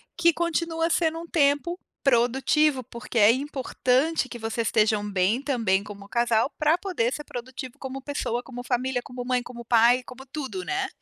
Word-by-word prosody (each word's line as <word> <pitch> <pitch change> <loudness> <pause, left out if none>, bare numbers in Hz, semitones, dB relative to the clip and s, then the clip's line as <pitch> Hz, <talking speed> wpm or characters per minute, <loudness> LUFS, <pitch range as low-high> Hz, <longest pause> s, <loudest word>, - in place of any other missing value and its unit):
que 335 0 +4
continua 335 0 -1
sendo 330 -1 +1
um 340 - -9
tempo 310 +3 +1 0.2
produtivo, 265 +3 +3
porque 235 +1 -7
é 210 0 +7
importante 265 +2 0
que 240 - -7
vocês 225 0 -2
estejam 210 -1 +2
bem 195 +6 +1
também 225 -9 +1
como 200 -1 -10
casal, 235 +2 +1
pra 305 +2 +3
poder 345 -11 -1
ser 295 - -4
produtivo 255 0 -7
como 265 0 -5
pessoa, 260 -4 -3
como 245 -1 -8
família, 250 0 -1
como 245 0 -7
mãe, 250 0 +1
como 240 -1 -10
pai, 240 +2 +4
como 260 +3 -11
tudo, 300 +7 -5
né? 380 0 -1
255 Hz, 170 wpm, -26 LUFS, 235-300 Hz, 0.2 s, é